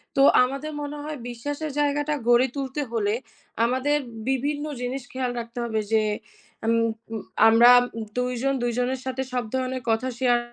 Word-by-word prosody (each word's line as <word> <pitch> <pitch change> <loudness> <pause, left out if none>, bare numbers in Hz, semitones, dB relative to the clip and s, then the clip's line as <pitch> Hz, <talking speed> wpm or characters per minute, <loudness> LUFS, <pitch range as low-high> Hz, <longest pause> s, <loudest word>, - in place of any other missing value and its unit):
তো 275 - +4 0.2
আমাদের 275 +4 -3
মনে 290 0 -5
হয় 305 0 -5
বিশ্বাসের 290 +6 -4
জায়গাটা 290 +1 +1
গড়ে 240 +2 +5
তুলতে 275 +1 -3
হলে, 210 -3 0 0.5
আমাদের 260 +5 +1 0.3
বিভিন্ন 290 +3 0 0.2
জিনিস 250 +2 -3
খেয়াল 255 -1 -2
রাখতে 235 +1 -7
হবে 220 -2 -1
যে, 220 -1 +4 0.6
আম 225 - +3 0.4
উম 220 - -3 0.3
আমরা 230 +2 +8 0.5
২ 250 0 0
জন 275 0 +2
২ 240 - +1
জনের 255 +1 0
সাথে 260 0 -2
সব 250 -1 0
ধরনের 260 0 -1
কথা 225 +3 +1
শেয়ার 245 -2 +3
255 Hz, 160 wpm, -25 LUFS, 240-285 Hz, 0.6 s, আমরা